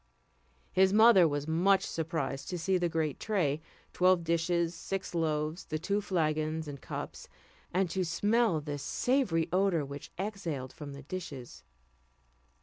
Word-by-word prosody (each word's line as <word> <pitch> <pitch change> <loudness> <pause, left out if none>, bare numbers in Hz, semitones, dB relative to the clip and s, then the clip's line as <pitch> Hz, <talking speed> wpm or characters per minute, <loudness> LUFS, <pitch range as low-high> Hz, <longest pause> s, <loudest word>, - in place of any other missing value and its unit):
His 190 +1 +4
mother 215 -4 +7
was 145 -1 -2
much 185 +5 +3
surprised 155 -4 -3
to 180 - -2
see 185 +2 +1
the 175 -1 +1
great 160 -3 -1
tray, 160 -9 0 0.3
twelve 180 -1 +4
dishes, 170 +1 +1
six 190 +3 -4
loaves, 155 0 -1
the 155 - -3
two 200 +6 -1
flagons 155 -4 -1
and 140 -2 -7
cups, - - -6 0.4
and 185 +1 +2
to 190 - 0
smell 205 +1 +2
the 145 -1 -4
savoury 200 - +1
odour 185 -5 +2
which 140 +1 -8
exhaled 170 -10 -4
from 145 -2 -8
the 140 - -10
dishes. 135 - -7
165 Hz, 145 wpm, -31 LUFS, 150-190 Hz, 0.4 s, mother